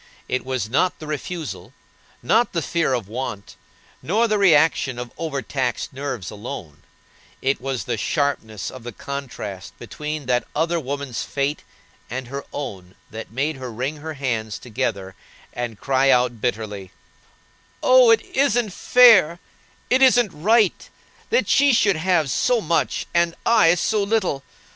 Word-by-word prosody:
It 130 - -1
was 130 -4 -2
not 160 +10 +1
the 155 - -9
refusal, 155 +1 -5 0.5
not 225 - +2
the 165 -3 -1
fear 165 -6 0
of 115 -6 -4
want, 110 -2 -6 0.5
nor 220 +7 +1
the 215 -2 +1
reaction 155 -8 +3
of 120 -1 -6
overtaxed 135 -6 -3
nerves 130 -8 -5
alone; 105 - -8 0.6
it 135 0 0
was 135 -2 -3
the - - -3
sharpness 110 - -2
of 130 - -10
the 120 0 -8
contrast 110 -8 -7
between 150 +6 -6
that 125 -1 0
other 165 +2 +1
woman's 140 -3 -4
fate 140 +2 -2 0.5
and 125 0 -5
her 140 +1 -5
own 95 -10 -7 0.2
that 110 +1 -7
made 140 +5 -2
her 130 -2 -6
wring 130 +7 -3
her 155 +1 -7
hands 115 -6 -2
together, 105 -6 -3 0.4
and 120 -4 -5
cry 135 +2 +2
out, 125 -3 +2
bitterly: 105 -5 -3 0.9
"Oh, 255 -2 +7
it 225 -1 +5
isn't 245 -6 +1
fair, 220 -9 +6 0.5
it 260 +1 +4
isn't 245 -5 +5
right, 205 +6 +2 0.4
that 475 - +2
she 280 -1 +4
should 200 -5 +3
have 160 -4 +1
so 245 - +2
much 170 -4 0
and 170 -1 +2
I 210 -8 +5
so 210 +4 0
little! 200 -9 0
140 Hz, 145 wpm, -22 LUFS, 120-175 Hz, 0.9 s, Oh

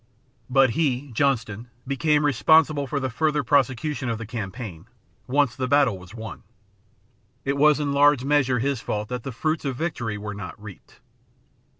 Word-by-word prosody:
But 135 -1 +4
he, 140 -1 -1
Johnston, 115 -3 -1 0.2
became 150 +2 +1
responsible 150 0 +3
for 140 +2 -2
the 130 -2 -3
further 150 +3 0
prosecution 135 0 0
of 115 - -1
the 115 - -7
campaign, 105 -4 -7 0.4
once 135 -1 +1
the 130 -1 -2
battle 140 -5 +3
was 90 +4 -13
won. 110 -2 -8 1.0
It 140 0 0
was 150 +1 +4
in 145 -1 -1
large 145 -2 +4
measure 135 -3 +2
his 135 0 -1
fault 105 0 -3
that 125 -1 -4
the 135 - -6
fruits 155 +7 -2
of 135 -3 -2
victory 120 -8 -3
were 105 0 -6
not 100 -1 -8
reaped. 105 -3 -13
130 Hz, 165 wpm, -24 LUFS, 115-145 Hz, 1.0 s, But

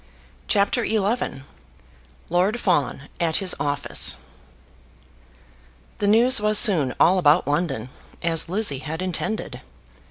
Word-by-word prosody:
CHAPTER 205 +3 0
XI 215 - -3 0.8
Lord 185 +7 -1
Fawn 150 -8 -2 0.2
at 165 -2 -2
His 190 -2 +2
Office 145 0 +3 1.8
The 205 - -2
news 235 +3 +4
was 210 0 +4
soon 165 - +4
all 185 +2 +3
about 155 -2 +2
London, 145 -3 -3 0.3
as 165 -1 0
Lizzie 185 -8 0
had 160 +5 -7
intended. 185 +4 -5
180 Hz, 105 wpm, -21 LUFS, 150-210 Hz, 1.8 s, news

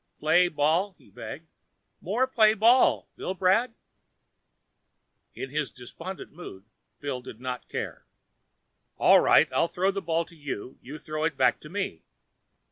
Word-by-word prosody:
"Play 165 +4 +4
ball?" 170 +5 +1
he - - -22
begged. 135 +9 -9 0.5
"More 220 +9 +1
play 220 -4 +4
ball, 235 +5 +4
Billbrad?" 190 +6 +1 1.6
In 135 - -6
his 150 -2 -1
despondent 165 +9 -9
mood, 125 - -11 0.3
Bill 140 -3 -4
did 115 -2 -11
not 125 -1 -5
care. - - -5 0.9
"All - - +6
right. - - +5
I'll - - +2
throw 185 +3 0
the 195 0 -4
ball 165 -1 0
to 170 - -18
you 145 -7 -6
and - - -24
you 140 +5 -9
throw 155 0 -5
it 160 -3 -1
back - - +3
to 150 - -12
me." 190 - -4
165 Hz, 145 wpm, -27 LUFS, 145-190 Hz, 1.6 s, All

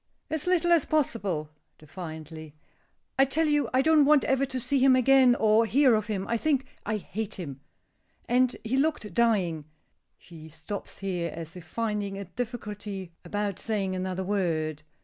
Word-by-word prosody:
"As 315 +1 -2
little 345 -1 +2
as 335 -3 +4
possible," 200 - -1 0.3
defiantly. 155 -1 -9 0.6
"I 270 - +7
tell 310 +4 +1
you 295 -1 +1
I 260 +1 +3
don't 315 -1 +5
want 295 0 +5
ever 270 +1 +1
to 260 -1 -3
see 275 +3 0
him 260 0 +6
again, 255 -1 +5
or 220 0 +3
hear 265 +1 +4
of 215 -1 +1
him; 200 -3 -2
I 235 - 0
think 275 0 +1 0.2
I 215 0 0
hate 215 +1 -5
him. 140 -8 -7 0.7
And 250 0 +2
he 235 +4 -1
looked 275 - 0
dying." 185 -10 +1 0.5
She 160 -2 -13
stops 160 +6 -7
here, 180 -3 -3
as 165 +2 -8
if 180 -2 -10
finding 205 +1 -3
a 200 - -5
difficulty 210 -3 -6
about 205 +1 -3
saying 200 -4 -2
another 185 0 -3
word. 165 -6 -1
210 Hz, 165 wpm, -27 LUFS, 180-260 Hz, 0.7 s, I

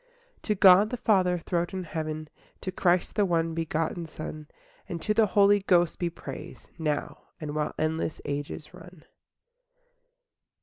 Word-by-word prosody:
IV - - -34
To 210 - 0
God 195 +2 +7
the 250 - -3
Father 185 -6 +3
throned 175 +2 -2
in 185 -1 -3
heaven, 155 -1 -4 0.3
To 185 - -3
Christ 180 -1 +1
the 205 - +2
one 165 -3 +1
begotten 165 +1 -2
Son, 155 -1 -7 0.4
And 170 -3 -4
to 215 - 0
the 215 0 +4
Holy 205 +1 +5
Ghost 175 -4 +2
be 175 - 0
praise, 170 0 -9
Now, 150 -2 -2
and 150 -2 -5
while 150 0 -2
endless 160 0 -1
ages 145 +2 -5
run. 180 -4 -14
170 Hz, 155 wpm, -27 LUFS, 155-185 Hz, 0.4 s, God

